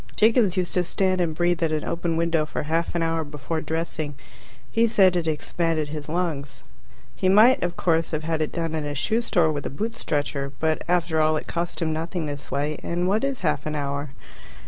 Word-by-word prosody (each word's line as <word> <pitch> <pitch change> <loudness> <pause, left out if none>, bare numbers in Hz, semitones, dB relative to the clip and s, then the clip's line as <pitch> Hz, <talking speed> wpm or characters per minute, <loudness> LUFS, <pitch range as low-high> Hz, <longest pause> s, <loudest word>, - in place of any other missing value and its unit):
Jiggins 220 -4 +4
used 180 -1 0
to 180 - +3
stand 185 +1 +1
and 160 -3 0
breathe 175 +1 +1
at 165 -1 +1
an 155 -1 -1
open 170 -1 -1
window 165 -1 +2
for 150 - -4
half 165 +3 -1
an 170 - +1
hour 165 0 0
before 150 +2 -4
dressing. 160 -2 -3 0.6
He 230 +1 +3
said 190 -5 +4
it 170 -2 0
expanded 160 0 -1
his 150 -1 -6
lungs. 160 -5 -2 0.5
He 185 - +1
might, 220 +7 +6
of 175 0 -2
course, 165 -2 +2
have 155 -1 -3
had 160 0 -1
it 155 - -1
done 165 -2 -2
in 155 -1 -1
a 145 0 -3
shoe 220 - +1
store 175 -9 +2
with 145 -2 -3
a - - -4
boot 220 +11 -3
stretcher, 145 -6 -2
but 160 0 0
after 170 -2 +2
all 155 0 +3
it - - -5
cost 170 0 -2
him 160 -1 0
nothing 165 +1 -3
this 145 -1 -6
way, 145 +2 -1
and 175 +1 -1
what 210 +5 +1
is 275 -2 -1
half 150 -4 0
an 155 - -2
hour? 140 0 -2
165 Hz, 215 wpm, -24 LUFS, 155-175 Hz, 0.6 s, might